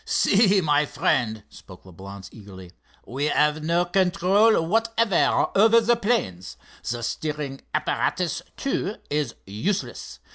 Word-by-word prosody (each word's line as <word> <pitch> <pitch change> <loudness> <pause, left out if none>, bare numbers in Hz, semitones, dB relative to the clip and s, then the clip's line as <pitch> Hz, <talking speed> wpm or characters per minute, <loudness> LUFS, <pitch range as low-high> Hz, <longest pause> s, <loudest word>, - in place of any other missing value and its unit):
"See, 205 - +3
my 150 -2 +2
friend," 110 -6 -1
spoke 95 -2 -15
Leblance, 95 +2 -11
eagerly, 95 -4 -13 0.3
"we 135 +5 -3
have 150 0 +1
no 170 +2 +1
control 195 +4 +3
whatever 225 0 +1
over 220 +3 +6
the 235 +1 +2
planes. 205 - -2 0.3
The 120 -1 -3
steering 145 +1 -4
apparatus, 175 -4 -1 0.2
too, 220 -7 -2 0.2
is 145 -5 -2
useless. 175 - -4
160 Hz, 115 wpm, -24 LUFS, -, 0.3 s, over